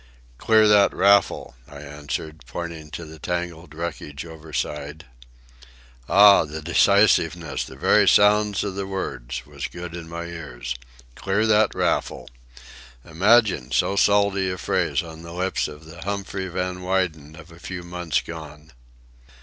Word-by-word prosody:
"Clear 110 Hz, -1 st, +4 dB
that 105 Hz, -1 st, +5 dB
raffle," 100 Hz, -8 st, +3 dB, 0.2 s
I 75 Hz, -, -13 dB
answered, 75 Hz, +1 st, -6 dB
pointing 80 Hz, +2 st, -7 dB
to 80 Hz, +2 st, -7 dB
the 80 Hz, 0 st, -12 dB
tangled 85 Hz, -2 st, -5 dB
wreckage 80 Hz, -3 st, -6 dB
overside. 75 Hz, -2 st, -5 dB, 1.0 s
Ah, 100 Hz, -1 st, +7 dB
the 80 Hz, 0 st, -7 dB
decisiveness, 85 Hz, -1 st, +2 dB
the -, -, -11 dB
very -, -, +3 dB
sound 105 Hz, -1 st, +4 dB
of 100 Hz, -2 st, -3 dB
the 95 Hz, 0 st, -4 dB
words, 65 Hz, -10 st, -5 dB
was -, -, -6 dB
good 85 Hz, -1 st, -8 dB
in 85 Hz, -1 st, -8 dB
my 85 Hz, 0 st, -5 dB
ears. 75 Hz, -8 st, -6 dB, 0.4 s
"Clear 100 Hz, -, 0 dB
that 110 Hz, -1 st, +3 dB
raffle!" -, -, -1 dB, 0.8 s
Imagine 95 Hz, -, +3 dB
so 100 Hz, -, +1 dB
salty 100 Hz, -1 st, +3 dB
a 90 Hz, -, -4 dB
phrase -, -, 0 dB
on 80 Hz, -1 st, -10 dB
the 85 Hz, 0 st, -10 dB
lips 90 Hz, +2 st, -1 dB
of 75 Hz, +1 st, -11 dB
the 80 Hz, +1 st, -12 dB
Humphrey 100 Hz, 0 st, -4 dB
Van 90 Hz, 0 st, -4 dB
Weyden 90 Hz, -5 st, -2 dB
of 80 Hz, +1 st, -14 dB
a 85 Hz, -, -15 dB
few 90 Hz, 0 st, -7 dB
months 85 Hz, -4 st, -2 dB
gone! 75 Hz, -1 st, -10 dB
85 Hz, 140 wpm, -23 LUFS, 80-95 Hz, 1.0 s, Ah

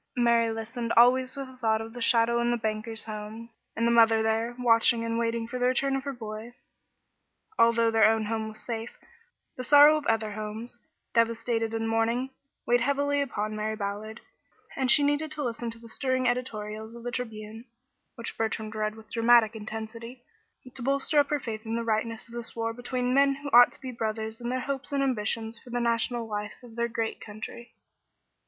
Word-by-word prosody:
Mary 235 Hz, -1 st, +3 dB
listened 230 Hz, +1 st, -4 dB
always 255 Hz, +2 st, +5 dB
with 275 Hz, -1 st, -5 dB
a 260 Hz, -, -13 dB
thought 220 Hz, -3 st, +1 dB
of 225 Hz, 0 st, -7 dB
the 245 Hz, -, -8 dB
shadow 235 Hz, 0 st, +4 dB
in 240 Hz, -, +1 dB
the 240 Hz, -, +1 dB
banker's 220 Hz, 0 st, -3 dB
home, 215 Hz, +2 st, -7 dB, 0.2 s
and 230 Hz, -, 0 dB
the 235 Hz, -, +3 dB
mother 225 Hz, -1 st, +5 dB
there, 225 Hz, +2 st, 0 dB
watching 230 Hz, -1 st, +3 dB
and 230 Hz, 0 st, -1 dB
waiting 230 Hz, 0 st, -1 dB
for 250 Hz, +1 st, -5 dB
the 250 Hz, -, +2 dB
return 270 Hz, +2 st, +1 dB
of 270 Hz, -, -2 dB
her 280 Hz, -, -2 dB
boy. 225 Hz, -1 st, -8 dB, 1.0 s
Although 230 Hz, 0 st, +4 dB
their 220 Hz, -1 st, +5 dB
own 220 Hz, -1 st, +1 dB
home 220 Hz, 0 st, -2 dB
was 215 Hz, 0 st, -9 dB
safe, 230 Hz, -1 st, -5 dB, 0.6 s
the 255 Hz, -, -4 dB
sorrow 290 Hz, +3 st, +7 dB
of 295 Hz, -, -5 dB
other 220 Hz, -1 st, +1 dB
homes, 215 Hz, +3 st, -6 dB, 0.3 s
devastated 230 Hz, 0 st, +1 dB
and 225 Hz, 0 st, -1 dB
mourning, 230 Hz, +3 st, 0 dB, 0.3 s
weighed 240 Hz, 0 st, +3 dB
heavily 285 Hz, +2 st, +1 dB
upon 215 Hz, -6 st, -3 dB
Mary 215 Hz, +1 st, -2 dB
Ballard, 210 Hz, +1 st, -5 dB, 0.5 s
and 260 Hz, -1 st, 0 dB
she 290 Hz, +4 st, +7 dB
needed 290 Hz, +2 st, +1 dB
to 300 Hz, -1 st, -4 dB
listen 235 Hz, -1 st, -3 dB
to 230 Hz, -, -7 dB
the 230 Hz, 0 st, -13 dB
stirring 260 Hz, +1 st, 0 dB
editorials 220 Hz, -3 st, -3 dB
of 235 Hz, -, -10 dB
the 245 Hz, -, -3 dB
Tribune, 225 Hz, -2 st, -5 dB, 0.5 s
which 235 Hz, -2 st, -6 dB
Bertrand 220 Hz, -1 st, -2 dB
read 215 Hz, 0 st, -2 dB
with 220 Hz, -1 st, -15 dB
dramatic 230 Hz, -1 st, +4 dB
intensity, 225 Hz, +3 st, -7 dB, 0.5 s
to 260 Hz, -, -9 dB
bolster 275 Hz, +3 st, +2 dB
up 285 Hz, -, +3 dB
her 295 Hz, -, +1 dB
faith 220 Hz, -4 st, -6 dB
in 225 Hz, 0 st, -3 dB
the 235 Hz, -, -1 dB
rightness 225 Hz, 0 st, -2 dB
of 235 Hz, -, -15 dB
this 235 Hz, -1 st, -5 dB
war 230 Hz, 0 st, -2 dB
between 245 Hz, +1 st, -2 dB
men 275 Hz, 0 st, +4 dB
who 285 Hz, +1 st, -7 dB
ought 245 Hz, +1 st, +8 dB
to -, -, -13 dB
be 260 Hz, -1 st, -5 dB
brothers 220 Hz, -1 st, -3 dB
in 240 Hz, -, -3 dB
their 255 Hz, +1 st, -1 dB
hopes 275 Hz, +1 st, -4 dB
and 280 Hz, -1 st, +1 dB
ambitions 225 Hz, -2 st, -1 dB
for 250 Hz, -, -16 dB
the 245 Hz, 0 st, -2 dB
national 235 Hz, 0 st, 0 dB
life 210 Hz, -1 st, -4 dB
of 235 Hz, -2 st, -13 dB
their 235 Hz, 0 st, 0 dB
great 225 Hz, -1 st, -3 dB
country. 220 Hz, +2 st, -9 dB
230 Hz, 200 wpm, -27 LUFS, 220-245 Hz, 1.0 s, ought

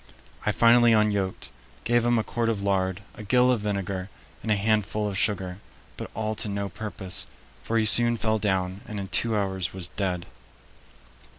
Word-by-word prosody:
I -, -, +4 dB
finally 120 Hz, 0 st, +5 dB
unyoked, 105 Hz, -3 st, 0 dB, 0.3 s
gave 120 Hz, 0 st, +2 dB
him 120 Hz, 0 st, +2 dB
a 110 Hz, -, +1 dB
quart 115 Hz, 0 st, -1 dB
of 105 Hz, -3 st, -2 dB
lard, 95 Hz, -1 st, 0 dB
a -, -, -11 dB
gill 125 Hz, +4 st, +3 dB
of 125 Hz, -, +1 dB
vinegar, 100 Hz, -2 st, -3 dB, 0.3 s
and 110 Hz, -, -3 dB
a -, -, +4 dB
handful 105 Hz, 0 st, 0 dB
of 100 Hz, -, -4 dB
sugar, 95 Hz, -2 st, 0 dB, 0.4 s
but -, -, -7 dB
all 110 Hz, 0 st, -2 dB
to 105 Hz, -, -2 dB
no 100 Hz, 0 st, -3 dB
purpose, 95 Hz, -1 st, -3 dB, 0.3 s
for 115 Hz, -, -1 dB
he 110 Hz, -, +2 dB
soon 120 Hz, +2 st, +6 dB
fell 110 Hz, 0 st, 0 dB
down 95 Hz, -1 st, -1 dB
and 105 Hz, -3 st, -5 dB
in 95 Hz, -1 st, -6 dB
two 115 Hz, -2 st, +1 dB
hours 95 Hz, -2 st, -2 dB
was 90 Hz, -2 st, -4 dB
dead." 90 Hz, -3 st, -3 dB
105 Hz, 180 wpm, -26 LUFS, 95-110 Hz, 0.4 s, soon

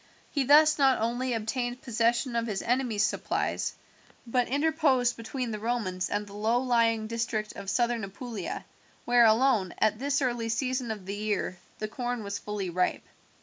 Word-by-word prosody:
He 280 Hz, -3 st, 0 dB
thus 305 Hz, +2 st, +6 dB
not 270 Hz, -2 st, +4 dB
only 245 Hz, +3 st, -1 dB
obtained 245 Hz, +3 st, -2 dB
possession 235 Hz, +1 st, +1 dB
of 230 Hz, 0 st, 0 dB
his 205 Hz, -3 st, -2 dB
enemy's 240 Hz, -4 st, +1 dB
supplies, -, -, -1 dB, 0.5 s
but 245 Hz, +1 st, +1 dB
interposed 280 Hz, -4 st, +2 dB
between 235 Hz, +1 st, -4 dB
the 215 Hz, -, -4 dB
Romans 210 Hz, -6 st, -2 dB
and 205 Hz, 0 st, -1 dB
the 200 Hz, -, -13 dB
low 220 Hz, +3 st, +1 dB
lying 230 Hz, -3 st, +2 dB
district 225 Hz, -1 st, -2 dB
of 200 Hz, -1 st, -6 dB
Southern 235 Hz, +1 st, +1 dB
Apulia, 200 Hz, 0 st, -6 dB, 0.4 s
where 240 Hz, -1 st, +5 dB
alone, 220 Hz, -4 st, +3 dB
at, 215 Hz, 0 st, +2 dB
this 280 Hz, +1 st, +1 dB
early 240 Hz, -3 st, -1 dB
season 255 Hz, +1 st, -1 dB
of 210 Hz, -4 st, -5 dB
the 195 Hz, -, -4 dB
year, 205 Hz, -3 st, -2 dB, 0.2 s
the 215 Hz, -, -3 dB
corn 245 Hz, 0 st, -3 dB
was 200 Hz, 0 st, -4 dB
fully 205 Hz, -3 st, -4 dB
ripe. 180 Hz, +1 st, 0 dB
230 Hz, 165 wpm, -28 LUFS, 215-250 Hz, 0.5 s, thus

